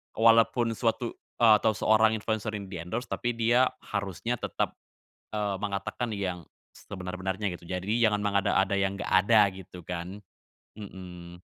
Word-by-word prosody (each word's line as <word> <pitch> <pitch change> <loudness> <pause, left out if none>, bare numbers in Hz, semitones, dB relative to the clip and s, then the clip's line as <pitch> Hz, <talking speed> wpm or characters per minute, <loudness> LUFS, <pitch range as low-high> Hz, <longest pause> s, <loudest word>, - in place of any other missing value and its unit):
Walaupun 115 +1 +4
suatu, 120 0 0 0.3
eee, 115 -2 +8
atau 110 - +2
seorang 110 +1 +4
influencer 110 0 -2
ini 100 -2 -6
di 90 - -5
endorse, 100 +9 -4
tapi 120 -1 -1
dia 120 +3 +4 0.2
harusnya 100 +4 -3
tetap, - - -2 0.6
eee, 105 -2 -1
mengatakan 105 +3 -3
yang 90 -4 -4 0.3
sebenar-benarnya 95 +1 -4
gitu. 85 - -16
Jadi, 95 +6 -1
jangan 105 -3 +3
mengada-ada 100 -1 +2
yang 95 0 0
enggak 100 - -4
ada 105 +3 +6
gitu 90 -2 -11
kan 90 +4 -6 0.6
mhm. 90 -3 -10
100 Hz, 140 wpm, -28 LUFS, 95-110 Hz, 0.6 s, eee